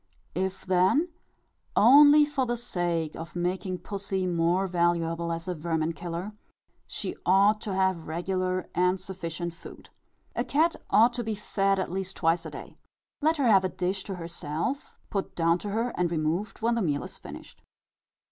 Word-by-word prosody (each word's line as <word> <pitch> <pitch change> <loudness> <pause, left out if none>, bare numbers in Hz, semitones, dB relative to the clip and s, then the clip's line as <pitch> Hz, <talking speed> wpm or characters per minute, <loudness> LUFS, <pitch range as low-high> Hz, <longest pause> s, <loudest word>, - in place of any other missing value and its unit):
If 190 +1 -3
then, 190 - +3 0.7
only 290 +6 +8
for 280 -3 -1
the 240 0 -1
sake 175 -8 -2
of 165 +1 -8
making 180 +1 -2
pussy 195 -1 -3
more 175 +2 +1
valuable 170 -2 0
as 165 +1 -4
a 180 - -1
vermin 160 0 -1
killer, 170 +5 -5 0.6
she - - -4
ought 200 +3 +4
to 200 -4 -3
have 190 -3 +1
regular 185 +2 -2
and 180 +2 +2
sufficient 175 -2 -5
food. 170 - -13 0.4
A - - 0
cat 320 +4 +2
ought 225 +4 +5
to 240 0 -3
be 220 -1 -2
fed 195 -1 0
at 190 - -2
least 190 0 -3
twice 165 0 +1
a - - -6
day. - - -10 0.4
Let 315 +2 +2
her 280 - +1
have 200 -5 +6
a 185 - 0
dish 185 +2 -2
to 195 - -4
herself, 170 - -4
put 195 -2 -3
down 170 +1 +2
to 205 - -5
her, 225 +4 0
and 180 -1 +1
removed 170 +7 -2
when 235 +1 +3
the 235 - 0
meal 145 -6 0
is - - -8
finished. - - -11
185 Hz, 170 wpm, -27 LUFS, 170-205 Hz, 0.7 s, only